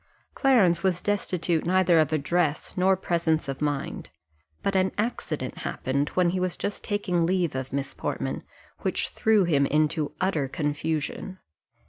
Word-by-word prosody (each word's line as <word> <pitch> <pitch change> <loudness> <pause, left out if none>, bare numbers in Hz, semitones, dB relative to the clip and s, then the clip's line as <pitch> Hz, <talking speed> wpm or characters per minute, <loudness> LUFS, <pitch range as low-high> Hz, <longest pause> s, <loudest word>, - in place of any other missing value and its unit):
Clarence 220 -11 +4
was 185 -2 +1
destitute 180 -5 0
neither 180 -1 +4
of 155 -1 +2
address 155 +1 0
nor 190 +1 +3
presence 170 -4 0
of 135 0 -4
mind; 145 -2 -2 0.5
but 195 - 0
an 190 0 +3
accident 180 - -3
happened, 140 +3 -1
when 180 -2 +3
he 185 - -1
was 180 -1 -1
just 205 - -3
taking 185 -5 0
leave 175 -2 +1
of 130 0 -4
Miss 140 +1 -3
Portman, - - -3 0.4
which - - -1
threw 220 -2 +3
him 145 -5 +3
into 150 0 +1
utter 165 -7 0
confusion. 155 +5 -2
170 Hz, 145 wpm, -26 LUFS, 150-185 Hz, 0.5 s, Clarence